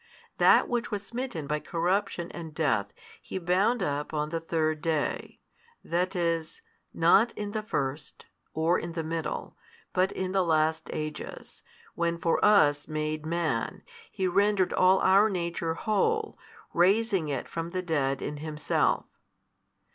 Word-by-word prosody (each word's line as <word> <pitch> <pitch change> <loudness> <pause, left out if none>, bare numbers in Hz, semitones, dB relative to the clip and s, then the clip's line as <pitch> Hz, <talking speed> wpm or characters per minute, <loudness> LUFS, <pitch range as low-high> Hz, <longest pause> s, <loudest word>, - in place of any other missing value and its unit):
That - - +6
which 245 -1 -1
was 205 -2 -4
smitten 235 - -4
by 150 +2 -1
corruption 175 +2 -1
and 160 -3 -8
death 115 -11 +1 0.3
He - - -6
bound 190 +6 +2
up 145 +1 -2
on 150 0 -1
the 165 +1 -2
third 155 -2 -1
day: 155 -3 -2 0.4
that 180 +3 -1
is, 165 -2 -1 0.3
not 195 +8 +4
in 205 -1 -5
the 215 0 -2
first, 140 -8 -4 0.3
or 165 +3 +1
in 170 0 -6
the 165 -1 -3
middle, 160 0 -4 0.4
but 185 +1 +2
in 185 -1 -3
the 190 -1 +2
last 160 -1 +1
ages, 155 0 -6 0.3
when 170 0 -1
for 165 0 0
us 150 -9 +4
made 155 0 -3
Man, 160 -9 -1 0.3
He 190 - -1
rendered 200 0 +2
all 185 +1 +5
our 195 +3 +5
nature 170 -3 -2
whole, 435 - 0 0.4
raising 195 -1 +2
it 135 -4 -3
from 165 0 -4
the 185 +1 -3
dead 140 -6 0
in 150 - -4
Himself. 150 0 0
170 Hz, 145 wpm, -28 LUFS, 155-190 Hz, 0.4 s, That